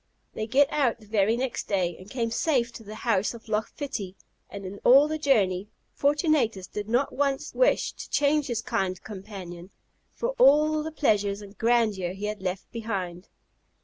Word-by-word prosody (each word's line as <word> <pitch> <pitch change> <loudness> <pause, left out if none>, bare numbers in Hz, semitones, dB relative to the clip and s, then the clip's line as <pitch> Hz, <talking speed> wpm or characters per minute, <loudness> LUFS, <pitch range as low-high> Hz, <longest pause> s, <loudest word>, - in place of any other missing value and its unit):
They 215 - -4
get 275 +4 +3
out 255 -6 +1
the 215 - -16
very 215 +1 +2
next 255 0 -3
day, 180 -4 0
and 185 +2 -12
came 230 -2 -2
safe 240 -2 +1
to 225 - -10
the 215 +1 -9
house 215 -1 +1
of 230 - -13
Loch 215 0 -1
Fitty; 215 -10 -5 0.3
and 200 -1 -8
in 195 +2 -7
all 275 +4 +6
the 310 0 -3
journey, 205 -10 +2 0.3
Fortunatus 285 - +1
did 210 +2 -6
not 245 +4 +1
once 275 -1 -1
wish - - +2
to - - -9
change 295 0 +2
his 230 -3 -2
kind 190 -6 -1
companion 190 -4 -9 0.5
for 475 - -2
all 305 - +5
the 315 +1 -5
pleasures 205 -9 +1
and 200 0 -13
grandeur 215 -6 +1
he 200 +2 -5
had 210 -1 -4
left 185 0 -4
behind. 195 -6 -4
220 Hz, 180 wpm, -26 LUFS, 195-275 Hz, 0.5 s, all